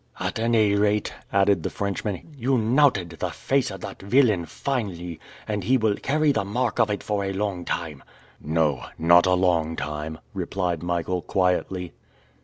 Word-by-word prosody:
"At - - -2
any 110 -3 +3
rate," 105 +1 +1 0.2
added 100 -2 +3
the - - -2
Frenchman, 100 - -4
"you 130 0 +1
knouted 115 - +3
the - - -1
face 135 -1 0
of 95 -2 -8
that - - -8
villain 105 -5 +3
finely, 90 - -3 0.3
and 105 -2 -2
he 130 +7 +3
will 110 -3 +2
carry 150 +5 +1
the 110 -6 0
mark 115 +3 -1
of 110 - +4
it 105 - -2
for 105 -1 -1
a 95 - -2
long 95 -3 -2
time!" 80 -5 -3 0.4
"No, 75 -3 0
not 85 +2 +5
a 90 - +4
long 85 -3 +1
time!" 75 +1 -4 0.2
replied 90 -4 -2
Michael 85 +1 -1
quietly. 90 -1 0
100 Hz, 165 wpm, -24 LUFS, 85-110 Hz, 0.4 s, not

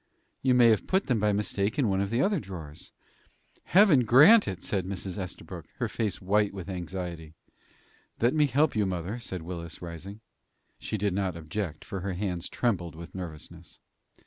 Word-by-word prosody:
"You 130 -1 +3
may 120 -2 +7
have 110 - +2
put 190 +1 +2
them, 125 -4 +1
by 105 0 +2
mistake, 100 0 -1
in 135 -5 +2
one 95 -1 +1
of 100 - -1
the 120 +5 +1
other 200 -3 +2
drawers." 90 - -8 0.7
"Heaven 185 -7 +6
grant 150 - +7
it!" 90 -2 -4
said 95 -3 -1
Mrs. 95 -1 -4
Estabrook, 90 -2 -7
her - - -1
face 110 -3 -2
white 100 +1 +1
with 95 -1 -7
anxiety. 85 -3 -6 0.8
"Let 120 +2 +3
me 150 -2 +4
help 140 +2 +2
you, 105 -2 +2
mother," 95 +5 -3
said 95 -7 -5
Willis, 85 -1 -7
rising. 90 +5 -8 0.6
She 110 - -3
did 100 -1 0
not 95 -3 -1
object, 80 0 -5
for 95 - -5
her 95 +1 -3
hands 90 -2 -3
trembled 90 -9 -1
with 85 +1 -10
nervousness. 85 -5 -9
100 Hz, 175 wpm, -28 LUFS, 90-115 Hz, 0.8 s, may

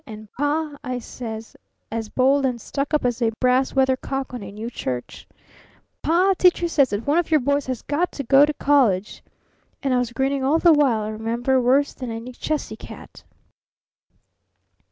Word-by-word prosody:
And 215 -2 -10
Pa,' 295 +1 -2
I 255 -1 -3
says, 225 -2 -8 0.4
as 225 -1 -4
bold 270 +4 +2
and 250 -3 0
stuck 275 +5 -4
up 300 -4 +1
as 245 0 -1
a 230 - +3
brass 255 +1 +2
weathercock 265 0 0
on 245 - -5
a 195 -1 -8
new 215 +3 -6
church, 125 - -5 0.7
'Pa! 365 +4 +3
Teacher 355 -1 +4
says 280 -6 +3
that 205 +2 -3
one 295 +4 +3
of 345 - -2
your 310 -2 +4
boys 280 +1 0
has 255 -3 -4
got 330 +5 -1
to 280 - -5
go 270 +3 +6
to 300 +1 +2
college!' 235 -10 +1 0.6
And 270 -2 +1
I 250 - +3
was 245 -1 -2
grinning 270 +2 -1
all 285 +4 +3
the 335 0 +5
while, 265 -8 +2
I 210 - -4
remember, 235 +4 0
worse 270 +4 +2
than 255 -2 -7
any 230 +2 -6
Chessy 275 -3 -3
cat. - - -12
260 Hz, 180 wpm, -22 LUFS, 230-285 Hz, 0.7 s, go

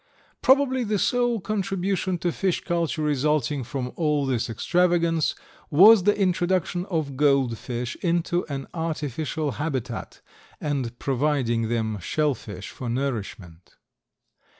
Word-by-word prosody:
Probably 260 -1 +4
the 210 -2 0
sole 245 +2 +1
contribution 190 -2 -1
to 175 +1 -1
fish 185 +1 -1
culture 170 -2 -1
resulting 150 -2 +1
from 125 0 -4
all 150 -3 +1
this 125 -3 -1
extravagance, 170 - +1 0.3
was 195 +5 +7
the 205 0 +3
introduction 180 -1 0
of 155 -6 -2
gold 140 -4 +3
fish 120 +1 -5
into 175 0 0
an 140 -2 -4
artificial 155 -2 -2
habitat 130 -7 -4 0.4
and 135 -6 -2
providing 130 -4 0
them 110 -3 -1
shell 150 - 0
fish 100 -5 -9
for 125 - -6
nourishment. 105 -9 -4
150 Hz, 120 wpm, -25 LUFS, 125-175 Hz, 0.4 s, was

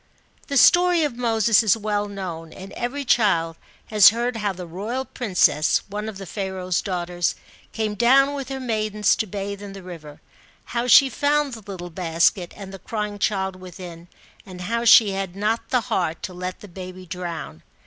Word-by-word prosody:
The 280 - -1
story 350 +2 +5
of 290 -5 -1
Moses 225 -2 +3
is 220 -1 +3
well 205 -1 -1
know, 185 -5 -6
and 185 +4 -11
every 275 +4 -4
child 170 -9 +2 0.4
has 210 -3 +8
heard 235 +2 -2
how 210 -2 -1
the 180 -1 -8
royal 210 +10 -4
princess, 185 - +1
one 210 +2 -4
of 210 - -8
Pharaoh's 190 -2 -2
daughters, 175 -2 -2 0.4
came 215 -1 -2
down 265 +6 +4
with 275 -2 -5
her 270 0 -4
maidens, 215 -4 0
to 220 - -2
bathe 200 +1 -5
in 200 -1 -8
the 195 -1 -10
river. 155 -5 -10 0.5
How 240 +1 -1
she 270 +2 +8
found 285 +2 0
the 215 -3 -9
little 175 -2 -7
basket 170 +1 +1
and 195 -1 -9
the 195 - -9
crying 210 0 -4
child 190 -3 -1
within, 180 -2 -10 0.4
and 185 -2 -10
how 230 +5 -2
she 220 -2 +7
had 195 -2 -4
not 215 +3 -1
the 250 -2 +2
heart 175 -6 -2
to 185 - -5
let 180 +1 -6
the 205 - -10
baby 185 0 -9
drown. 170 - -6
200 Hz, 180 wpm, -23 LUFS, 180-230 Hz, 0.5 s, has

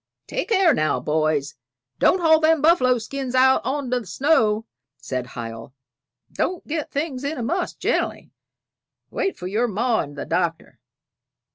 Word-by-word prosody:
"Take - - -4
care 380 -7 +4
now, 155 -8 +1
boys; 155 -2 0 0.5
don't 370 - +3
haul 320 -1 +5
them 320 0 +3
buffalo 275 -5 +4
skins 260 +3 -5
out 260 +1 +5
on 265 0 -2
t' 250 - +2
the 225 - -11
snow," 225 -7 +2 0.3
said 125 -1 -4
Hiel. 115 +1 -7 0.6
"Don't 365 -1 -2
get 305 -1 -3
things 280 -3 -3
in 290 +2 -3
a 240 - -3
muss 345 +9 -2
gen'ally; - - -2 0.8
wait 390 - -2
for 180 - -8
your 215 +6 0
ma 230 +2 0
and 145 -1 -4
the - - -4
Doctor. 170 -1 -2
250 Hz, 155 wpm, -23 LUFS, -, 0.8 s, haul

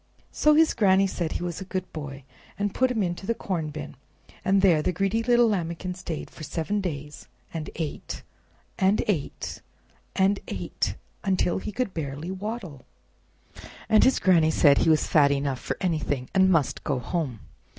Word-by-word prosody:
So 300 0 +4
his 320 +1 +5
Granny 195 -3 +4
said 175 -4 -2
he - - -3
was 175 +1 -4
a - - -3
good 185 -1 -5
boy, 145 -3 -7 0.3
and 205 -1 -1
put 260 0 +2
him 225 -5 0
into 175 +2 -3
the 230 - +1
corn 170 -8 -3
bin, 150 0 -7 0.5
and 195 0 +3
there 170 -6 +5
the 150 - 0
greedy 195 +5 0
little 240 0 +4
Lambikin 180 -3 -2
stayed 175 -3 -6
for - - -13
seven 180 +7 -2
days, 150 -5 -6 0.3
and 160 -2 -4
ate, 160 -3 -5 0.6
and 195 +2 +3
ate, 175 -9 -2 0.5
and 195 +1 +3
ate, - - -3 0.3
until 190 -2 +1
he 210 - -5
could 250 -1 -2
scarcely 150 +1 -4
waddle, 190 - -5 1.1
and 215 - +5
his 265 - +4
Granny 170 -4 +4
said 145 -3 +5
he - - +3
was 155 -1 +4
fat 145 -2 +4
enough 140 -2 -1
for - - -4
anything, 155 -7 -1
and 190 -1 +5
must 165 -6 +1
go 140 - 0
home. 130 - -3
180 Hz, 170 wpm, -26 LUFS, 155-195 Hz, 1.1 s, his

